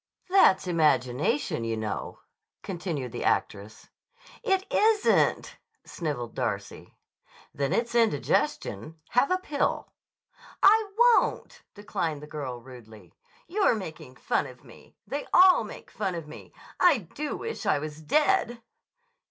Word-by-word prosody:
"That's 380 - +5
imagination, 150 -6 +1
you 115 -1 -2
know," 110 -1 -5 0.4
continued 170 - -4
the - - -5
actress. 105 +1 -2 0.5
"It 385 0 0
isn't," 435 0 +2 0.3
snivelled 145 -8 -5
Darcy. - - -5 0.6
"Then 140 -2 -2
it's 235 0 0
indigestion. 160 - 0
Have 250 +3 +2
a 370 - +2
pill." 300 -6 -2 0.7
"I 425 +1 +5
won't!" 480 0 +3
declined 170 -8 -4
the - - -6
girl 140 -5 -6
rudely. 110 -8 -14 0.3
"You're 395 - +2
making 155 -9 -8
fun - - -1
of - - -14
me. - - -17
They 285 +1 -5
all 365 -8 +7
make 210 - -11
fun 195 -4 -3
of 165 -3 -6
me. 150 - -12 0.3
I 350 -6 +5 0.2
do 300 +1 -4
wish 455 - -5
I - - +3
was 155 +1 -7
dead!" 300 - +1
170 Hz, 125 wpm, -27 LUFS, -, 0.7 s, all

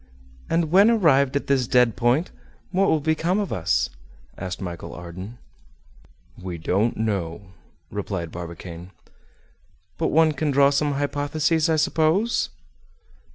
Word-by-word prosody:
"And 165 -2 +1
when 200 +5 +6
arrived 145 - +3
at 140 - 0
this 130 -3 +1
dead 125 -3 +3
point, 125 +9 +1 0.4
what 195 +1 +2
will 155 - +2
become 160 +5 +1
of 205 - -2
us?" 90 +1 0 0.4
asked 90 -1 -5
Michel 85 -3 -6
Ardan. 90 +7 -9 1.0
"We 90 -2 -5
don't 100 +8 0
know," 100 -4 -3 0.4
replied 95 -5 -4
Barbicane. 85 0 -8 1.1
"But - - +1
one 160 0 +4
can 150 +1 -2
draw 140 0 +4
some 145 +1 +1
hypotheses, 145 +3 0
I 160 - +3
suppose?" 160 +8 +1
140 Hz, 125 wpm, -23 LUFS, -, 1.1 s, when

